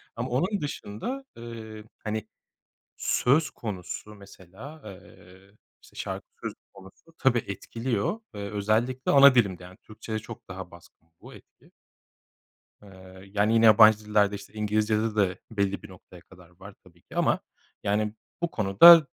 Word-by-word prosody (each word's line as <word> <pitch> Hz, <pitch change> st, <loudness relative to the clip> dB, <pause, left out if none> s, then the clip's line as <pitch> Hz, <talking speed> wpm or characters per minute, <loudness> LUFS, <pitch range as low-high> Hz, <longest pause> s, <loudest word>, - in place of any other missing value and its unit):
Ama 120 Hz, +3 st, -4 dB
onun 185 Hz, -, 0 dB
dışında, 150 Hz, -, -5 dB
eee, 110 Hz, -2 st, -9 dB, 0.2 s
hani, 110 Hz, 0 st, -3 dB, 0.7 s
söz 145 Hz, +6 st, +2 dB
konusu, 105 Hz, 0 st, -7 dB
mesela, 100 Hz, -, -13 dB
eee, 95 Hz, -1 st, -14 dB, 0.3 s
işte, -, -, -20 dB
şarkı -, -, -5 dB, 0.2 s
sözü -, -, -4 dB, 0.2 s
konusu, 95 Hz, -, -17 dB
tabii, 125 Hz, -4 st, +2 dB
etkiliyor 115 Hz, -, -3 dB
ve 100 Hz, -1 st, -6 dB
özellikle 110 Hz, +5 st, 0 dB
ana 140 Hz, -1 st, +8 dB
dilimde, 100 Hz, -7 st, +2 dB
yani, 90 Hz, +2 st, -13 dB
Türkçede 110 Hz, 0 st, -7 dB
çok -, -, -11 dB
daha -, -, -8 dB
baskın 80 Hz, -, -18 dB
bu -, -, -13 dB
etki. -, -, -19 dB, 1.1 s
Eee, 95 Hz, -1 st, -14 dB
yani, 105 Hz, +2 st, +2 dB
yine 115 Hz, 0 st, +4 dB
yabancı 110 Hz, -1 st, +8 dB
dillerde, 105 Hz, -1 st, +2 dB
işte, 100 Hz, +1 st, -13 dB
İngilizcede 110 Hz, +1 st, 0 dB
de 95 Hz, -3 st, +1 dB
belli 100 Hz, -2 st, -1 dB
bir -, -, -11 dB
noktaya 90 Hz, -1 st, -15 dB
kadar 90 Hz, -1 st, -18 dB
var 95 Hz, +3 st, -13 dB
tabii 85 Hz, -1 st, -21 dB
ki -, -, -14 dB
ama, -, -, +2 dB, 0.4 s
yani, 105 Hz, +1 st, 0 dB, 0.3 s
bu 170 Hz, -, 0 dB
konuda, 140 Hz, -, +8 dB
105 Hz, 140 wpm, -27 LUFS, 100-115 Hz, 1.1 s, ana